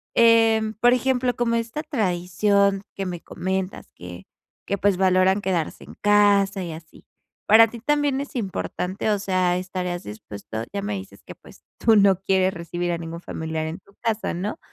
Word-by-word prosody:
em, 225 -1 +4
por 240 +3 +4
ejemplo, 250 -1 +1
como 235 -1 0
esta 230 +6 -3
tradición 200 - +1
que 195 - -3
me 180 -2 -4
comentas 190 0 -4
que 90 +1 -10 0.4
que 200 - -1
pues 200 0 +2
valoran 185 +1 +3
quedarse 180 -5 -2
en - - -13
casa 205 -2 +3
y 170 - -5
así, 160 0 -12 0.4
para 225 +2 +7
ti 230 0 -10
también 290 0 +1
es 280 - -9
importante, 190 -1 -3
o 205 - +1
sea, 185 -2 +1
estarías 180 -1 -4
dispuesto, 105 +1 -7
ya 200 0 -3
me 205 +1 -3
dices 195 0 -8
que - - -11
pues - - -18 0.2
tú 225 -2 +4
no 195 -2 +4
quieres 190 -1 +2
recibir 175 0 -3
a - - -2
ningún 165 0 -7
familiar 160 -2 -4
en 165 +4 -6
tu 200 - -25
casa, 225 -1 -1
¿no?, 200 - -4
195 Hz, 175 wpm, -23 LUFS, 180-220 Hz, 0.4 s, para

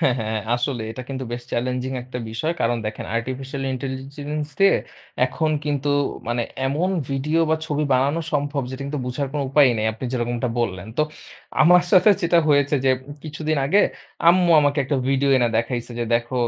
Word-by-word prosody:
হ্যাঁ, 130 -4 +4
হ্যাঁ। 110 0 -2
আসলে 120 -1 -2
এটা 125 +3 -6
কিন্তু 130 -1 -4
বেশ 120 0 -4
চ্যালেঞ্জিং 125 +2 -1
একটা 125 0 -7
বিষয়। 115 +10 -1
কারণ 120 +1 +2
দেখেন 110 - -5
আর্টিফিশিয়াল 130 +3 -4
ইন্টেলিজেন্স 140 +3 -4
দিয়ে, 195 0 +6 0.5
এখন 155 +4 -1
কিন্তু 145 -1 -1 0.4
মানে 120 0 0 0.2
এমন 155 +7 0 0.2
ভিডিও 150 +5 0
বা 160 - +3
ছবি 150 0 0
বানানো 140 +6 +2
সম্ভব 145 -1 0
যেটা 130 +1 -6
কিন্তু 145 0 -3
বুঝার 130 +3 -2
কোন 145 - -1
উপায়ই 135 -3 +5
নেই। 110 - 0
আপনি 110 +4 -8
যেরকমটা 120 0 -1
বললেন। 95 -4 -2
তো - - +5 0.6
আমার 175 +2 +7
সাথে 195 +3 +7
যেটা 170 0 +4
হয়েছে 145 0 +3
যে, 130 - +5 0.3
কিছুদিন 155 0 -2
আগে 200 +8 +4 0.5
আম্মু 175 0 +5
আমাকে 145 0 +1
একটা 140 +1 0
ভিডিও 135 +1 +2
এনে 120 -2 +3
দেখাইছে 120 +1 -2
যে 120 - 0
দেখো, 120 +2 -1
135 Hz, 175 wpm, -22 LUFS, 125-150 Hz, 0.6 s, আমার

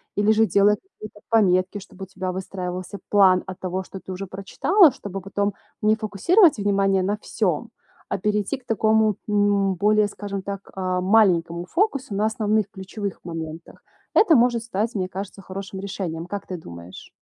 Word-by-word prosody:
или 205 +1 +3
же 220 +1 +4
делать 205 0 +3
какие-то 215 - -13
пометки, 190 -3 +3
чтобы 190 0 -11
у - - -7
тебя 185 0 -4
выстраивался 185 0 -5
план 190 -3 +5
от 190 -1 -7
того, 185 0 -3
что 190 - -9
ты 190 - -9
уже 190 +2 -5
прочитала, 275 - +3
чтобы 195 -1 -6
потом 200 +2 -1 0.3
не 215 +1 +4
фокусировать 245 - +4
внимание 195 -1 +2
на 205 +3 0
всём, 210 +1 -2 0.4
а - - -1
перейти 210 +5 -1
к 260 - -23
такому, 220 -2 +2
м, 205 -2 +2
более, 210 +3 +3
скажем 200 -1 -6
так, 200 0 -7
а, 185 -1 -1
маленькому 175 -4 +3
фокусу 275 - -1
на 210 +2 +1
основных 215 -2 0
ключевых 195 +1 -6
моментах. 165 -1 -7 0.3
Это 380 -7 +5
может 240 -1 +2
стать, 225 +1 -2
мне 185 -2 -2
кажется, 195 +1 -7
хорошим 195 +1 -7
решением. 175 -4 -4
Как 200 +2 -6
ты 185 - -4
думаешь? 85 - -11
200 Hz, 165 wpm, -23 LUFS, 185-215 Hz, 0.4 s, план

